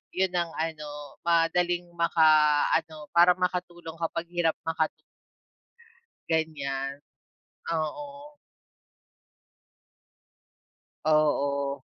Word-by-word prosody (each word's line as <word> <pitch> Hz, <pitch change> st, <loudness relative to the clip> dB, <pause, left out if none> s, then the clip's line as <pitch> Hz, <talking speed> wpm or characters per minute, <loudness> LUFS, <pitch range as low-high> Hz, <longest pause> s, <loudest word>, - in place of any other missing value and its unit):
Yon 190 Hz, -1 st, +1 dB
ang 170 Hz, -1 st, 0 dB
ano, 150 Hz, -3 st, -5 dB
madaling 175 Hz, +1 st, +2 dB
makaano, 155 Hz, -1 st, +3 dB
para 175 Hz, +1 st, +6 dB
makatulong 175 Hz, -2 st, -3 dB
kapag 165 Hz, +1 st, -3 dB
hirap 175 Hz, -2 st, +1 dB
makatu 160 Hz, -1 st, 0 dB, 1.4 s
Ganyan, 140 Hz, -4 st, -2 dB, 0.7 s
oo. 285 Hz, -, -5 dB, 2.7 s
Oo. 140 Hz, -2 st, +1 dB
160 Hz, 65 wpm, -27 LUFS, 150-175 Hz, 2.7 s, para